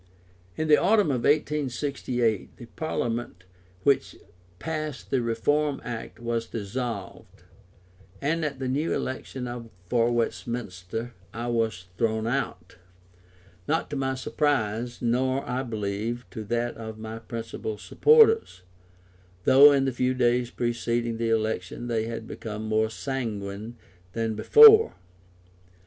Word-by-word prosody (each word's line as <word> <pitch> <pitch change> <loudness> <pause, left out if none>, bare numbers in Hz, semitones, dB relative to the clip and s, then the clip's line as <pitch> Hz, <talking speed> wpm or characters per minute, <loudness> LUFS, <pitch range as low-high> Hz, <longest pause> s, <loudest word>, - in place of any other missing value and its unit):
In 155 - -1
the 150 -1 +7
autumn 205 -7 +3
of 125 -3 -1
1868 135 -6 0
the 120 - -10
Parliament 120 - -3 0.4
which 140 -1 +2 0.4
passed 155 - -5
the 130 - +2
Reform 140 +5 0
Act 115 -2 -6
was 115 -1 -2
dissolved, 115 -1 -6 0.8
and 160 +3 0
at 145 -3 -2
the 130 -1 -3
new 145 +6 0
election 125 -2 -5 0.2
for 120 +4 +2
Westminster 115 -2 -3 0.2
I 120 +1 -3
was 110 -6 -1
thrown 110 -1 +1
out; 95 -8 -3 0.9
not 160 0 0
to - - -2
my 135 -1 -1
surprise, 120 -4 -1
nor, 130 +3 +1
I 125 +1 -1
believe, 110 0 -3
to 110 -4 -6
that 120 +3 -2
of 110 -1 -7
my 110 +1 -7
principal 115 -1 -5
supporters, 450 - +4 0.8
though 140 +6 +8
in 135 -1 +3
the 135 - 0
few 125 +1 0
days 120 -1 +2
preceding 120 -1 -1
the 115 -1 0
election 110 -1 -1
they 115 -2 -1
had 115 -1 -5
become 110 -2 -6
more 110 0 +1
sanguine 110 -3 -4 0.4
than 115 -1 -1
before. 440 - +8
120 Hz, 125 wpm, -26 LUFS, 110-135 Hz, 0.9 s, though